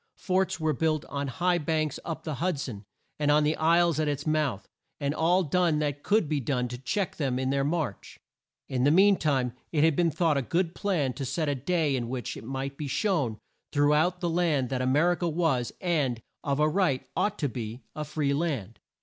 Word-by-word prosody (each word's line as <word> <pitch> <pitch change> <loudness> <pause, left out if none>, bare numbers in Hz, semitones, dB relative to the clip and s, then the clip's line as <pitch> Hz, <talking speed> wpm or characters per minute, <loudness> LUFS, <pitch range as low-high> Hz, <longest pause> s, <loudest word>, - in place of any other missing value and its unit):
Forts 190 -1 0
were 155 -1 +1
built 155 +2 0
on 140 0 -3
high 175 +7 +1
banks 155 -2 -1
up 165 - -5
the 155 - -3
Hud 175 -4 0
son, 110 -7 -6 0.3
and 145 -1 +1
on 150 +1 +5
the 150 +1 +2
isles 165 0 +3
at 155 - +1
its 145 0 -2
mouth, 150 -9 0 0.3
and 140 -1 -1
all 175 +4 +3
done 170 0 +2
that 145 -1 -1
could 205 -2 +2
be 150 -1 0
done 125 -1 -1
to 125 0 -6
check 190 +7 -2
them 135 -5 0
in 130 0 0
their 140 0 +1
march. 145 - -3 0.5
In 125 -2 -1
the 140 - +5
mean 195 +5 +6
time 135 -8 0 0.2
it 150 -2 +2
had 160 -2 +4
been 170 +1 +3
thought 160 -1 +1
a - - +2
good 170 +6 0
plan 175 -11 0
to 140 - -5
set 155 +4 -1
a 145 - +1
day 150 +1 0
in 120 -2 -3
which 125 -1 -4
it - - -9
might 135 +3 -4
be 150 - -4
shown 145 - 0 0.3
through 145 0 +3
out 175 +4 +2
the 175 - 0
land 160 -7 +1
that 130 -1 -1
A 130 - 0
mer 150 +7 +4
i - - +2
ca 175 - -1
was, 155 -7 0
and, 150 - 0 0.2
of 140 -1 0
a 150 - +4
right, 155 -6 +1
ought 210 0 0
to 145 - 0
be, 120 -1 -6
a 155 - -3
free 150 -2 -1
land. 140 - -2
150 Hz, 225 wpm, -28 LUFS, 135-170 Hz, 0.5 s, mean